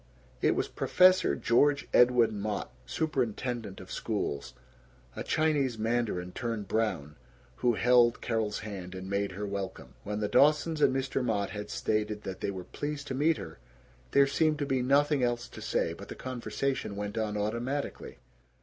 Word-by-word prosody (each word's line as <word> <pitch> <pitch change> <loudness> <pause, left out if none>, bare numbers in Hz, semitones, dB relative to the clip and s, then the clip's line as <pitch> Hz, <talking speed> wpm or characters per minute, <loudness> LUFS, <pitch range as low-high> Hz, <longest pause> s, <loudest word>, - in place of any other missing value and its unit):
It - - +3
was - - 0
"Professor" 185 0 +4
George 145 +4 +2
Edwin 120 -4 +5
Mott, 105 0 -3
superintendent 120 -7 -2
of 95 - -11
schools, 100 -10 -3 0.6
a - - -4
Chinese 145 -6 +1
mandarin 110 -5 -1
turned 115 -1 -4
brown, 105 -10 -1 0.4
who 120 -2 +2
held 120 0 +4
Carol's 110 -3 -1
hand 95 -3 -7
and 95 0 -6
made 100 0 -1
her 105 +3 -4
welcome. 100 -1 -5
When 105 +1 -3
the 105 - 0
Dawsons 150 +5 +3
and - - +5
Mr. 135 0 -1
Mott 100 -5 0
had 105 0 -6
stated 105 -1 -1
that 95 -1 -6
they - - -1
were 95 -2 -5
"pleased 145 +7 -5
to - - -2
meet 150 +4 +2
her," 80 -4 -9 0.5
there 140 - +5
seemed 155 +2 +2
to 145 - -1
be 135 -2 0
nothing 140 +2 +3
else 120 -1 0
to - - -10
say, - - 0
but - - -10
the - - -7
conversation 130 -2 -3
went 105 0 -4
on 110 -2 -1
automatically. 120 +7 -3
115 Hz, 165 wpm, -30 LUFS, 105-135 Hz, 0.6 s, Edwin